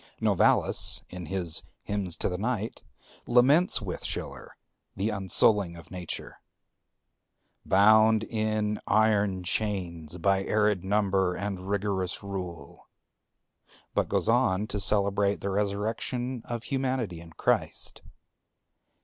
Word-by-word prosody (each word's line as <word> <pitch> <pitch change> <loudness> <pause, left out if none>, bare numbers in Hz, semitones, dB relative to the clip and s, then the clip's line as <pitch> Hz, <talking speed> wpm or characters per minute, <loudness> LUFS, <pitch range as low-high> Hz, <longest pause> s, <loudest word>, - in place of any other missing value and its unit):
Novalis - - +3
in 90 -2 -7
his 90 -4 -1 0.2
"Hymns 100 -4 -2
to - - -1
the 90 -1 -3
Night" 110 0 -2 0.5
laments 130 +4 +4
with 90 -3 -5
Schiller - - -5 0.4
the 100 +3 -1
unsouling 95 -2 +2
of 85 - -14
Nature, 90 -3 -6 1.3
"bound 110 +2 +5
in 110 -1 -1
iron 105 -4 +2
chains 90 -5 -2
by 95 +2 +2
arid 105 -3 +1
number 95 -2 +1
and 95 -1 -5
rigorous 100 -2 -2
rule;" 90 -4 -7 1.0
but - - 0
goes - - 0
on 95 +3 +2
to 105 - -4
celebrate 100 0 +1
the 100 - -2
resurrection 110 +5 -2
of 120 -1 -5
Humanity 130 -10 -2
in 85 -1 -14
Christ. - - -1
100 Hz, 110 wpm, -28 LUFS, 95-110 Hz, 1.3 s, bound